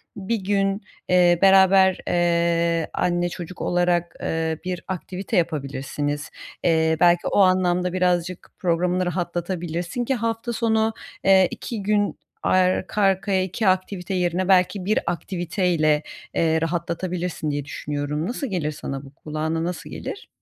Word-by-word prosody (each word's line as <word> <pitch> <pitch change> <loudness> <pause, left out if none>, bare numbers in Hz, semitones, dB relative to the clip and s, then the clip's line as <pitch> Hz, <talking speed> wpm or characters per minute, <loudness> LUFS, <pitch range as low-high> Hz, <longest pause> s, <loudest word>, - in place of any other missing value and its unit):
1 205 +4 -2
gün, 195 +1 +1 0.3
eee, 175 -1 +5
beraber, 190 -1 +6
eee, 170 -1 +2
anne 175 0 0
çocuk 175 0 -8
olarak, 175 -1 +1
eee, 160 -1 -1
bir 180 -2 -3
aktivite 185 +1 -3
yapabilirsiniz. 145 -2 -2 0.3
Eee, 160 -1 +3
belki 175 0 +4
o - - +1
anlamda 180 -1 +3
birazcık 180 -1 0
programını 180 +1 +1
rahatlatabilirsin 175 +3 -3
ki 265 - +1
hafta 230 +1 -2
sonu, 220 -1 +1 0.3
eee, 190 -1 +6
2 220 -4 -5
gün 205 0 +1 0.2
arka 185 +3 +2
arkaya 195 -1 +2
2 190 +3 -2
aktivite 185 0 0
yerine 180 0 0
belki 185 0 +3
1 215 +2 +2
aktiviteyle, 170 -3 0 0.3
eee, 160 -1 +2
rahatlatabilirsin 170 -1 -2
diye 145 -1 -3
düşünüyorum. 150 +2 -3
Nasıl 255 +4 -3
gelir 175 -8 -2
sana, 135 -2 -6
bu 135 - -14
kulağına 155 +2 -3
nasıl 175 +1 -4
gelir? 405 - -7
180 Hz, 130 wpm, -23 LUFS, 165-190 Hz, 0.3 s, beraber